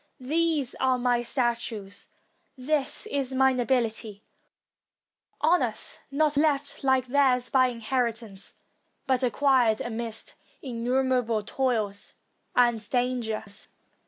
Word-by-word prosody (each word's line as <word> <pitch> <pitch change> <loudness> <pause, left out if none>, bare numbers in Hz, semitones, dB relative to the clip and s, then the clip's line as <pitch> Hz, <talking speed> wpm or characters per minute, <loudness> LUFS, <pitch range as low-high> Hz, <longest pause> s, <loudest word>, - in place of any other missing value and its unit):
These 300 0 0
are 260 -1 +2
my 245 -1 +1
statues; 235 -5 -2 0.5
this 280 +7 -1
is 275 -9 -2
my 265 0 +4
nobility; 230 -4 -1 1.2
honors, 295 -9 +1
not 295 +1 +1
left, 290 -2 0
like 265 -2 +3
theirs, 255 -1 +2
by 260 -1 +5
inheritance, 230 -4 -3 0.5
but 260 -2 +1
acquired 255 -3 +3
amidst 230 -1 -5 0.3
innumerable 250 -2 0
toils 215 -4 -2 0.4
and 240 -2 +4
dangers. 235 -5 -2
250 Hz, 95 wpm, -27 LUFS, 230-265 Hz, 1.2 s, by